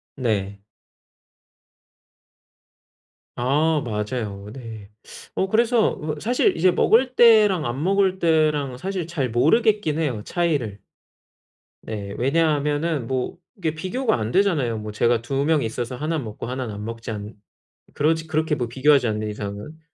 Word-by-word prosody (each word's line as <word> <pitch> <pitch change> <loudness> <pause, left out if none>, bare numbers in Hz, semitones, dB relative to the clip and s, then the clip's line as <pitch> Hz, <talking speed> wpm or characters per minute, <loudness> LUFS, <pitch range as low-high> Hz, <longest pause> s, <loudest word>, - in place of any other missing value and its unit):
네. 100 -6 -2 2.8
아 150 +5 +1
맞아요. 105 -2 -4
네. 110 -5 -9 0.4
어 190 - 0
그래서 230 +1 +2 0.2
사실 245 +4 +2
이제 180 +3 +4
먹을 255 +7 +3
때랑 215 -8 +6
안 130 +4 -3
먹을 190 0 +2
때랑 155 -6 +1
사실 185 +2 -4
잘 145 -7 -2
모르겠긴 160 - +2
해요. 130 -10 -1
차이를. 145 - -1 1.1
네. 100 -2 -5
왜냐하면은 150 0 +1
뭐 130 +5 -2 0.2
이게 160 -5 -2
비교가 220 +9 -1
안 110 0 -3
되잖아요. 150 - +1
뭐 105 0 -6
제가 115 +2 +2
2 135 +4 -1
명이 150 -4 +2
있어서 120 +2 -4
하나는 155 0 -2
먹고 110 +1 -7
하나는 125 -3 -4
안 105 +1 -6
먹지 115 +1 -6
않 105 0 -6 0.6
그렇지 160 +2 0
그렇게 155 -1 0
뭐 125 -4 -2
비교하지 130 +1 +3
않는 105 0 -2
이상은. 105 +8 -7
140 Hz, 265 characters per minute, -23 LUFS, 115-165 Hz, 2.8 s, 때랑